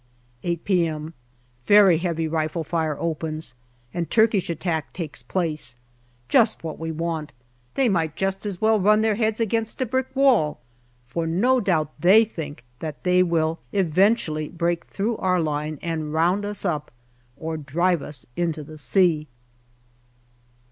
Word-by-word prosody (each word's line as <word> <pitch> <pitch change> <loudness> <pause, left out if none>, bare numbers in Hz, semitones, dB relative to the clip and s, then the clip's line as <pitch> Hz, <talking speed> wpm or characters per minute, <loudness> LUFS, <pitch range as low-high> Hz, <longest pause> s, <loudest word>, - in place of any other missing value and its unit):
8 170 -2 -3
p.m. 165 -4 0 0.5
Very 200 -5 +7
heavy 165 -2 -1
rifle 160 +1 -1
fire 160 -2 -1
opens, 160 -3 -3 0.4
and 175 -1 -3
Turkish 220 -5 +3
attack 165 -1 -2
takes 155 -7 -6
place. 155 -1 -3 0.5
Just 220 - +3
what 160 -2 -5
we 165 0 -3
want; 160 -1 -3 0.4
they 270 -2 +3
might 165 -7 0
just 195 +2 -1
as 200 -4 -4
well 220 0 +3
run 210 +3 +4
their 220 -1 +2
heads 220 +1 0
against 225 0 -1
a 260 - +1
brick 260 +2 -1
wall, 245 - +3 0.5
but 165 -1 -1
no 245 +10 +3
doubt 160 - +1
they 200 +7 +6
think 150 - -7 0.2
that 155 -2 -6
they 180 0 +4
will 165 -2 +1
eventually 180 -4 +2
break 170 0 -1
through 215 +3 -2
our 185 -1 +1
line 150 -1 -2
and 160 -3 -3
round 175 +6 +2
us 205 0 -4
up, 155 -5 -1 0.5
or 160 +1 -4
drive 165 +3 0
us 140 -3 -8
into 165 -3 -1
the 155 +1 -10
sea. 160 -2 +2
170 Hz, 150 wpm, -24 LUFS, 155-200 Hz, 0.5 s, Very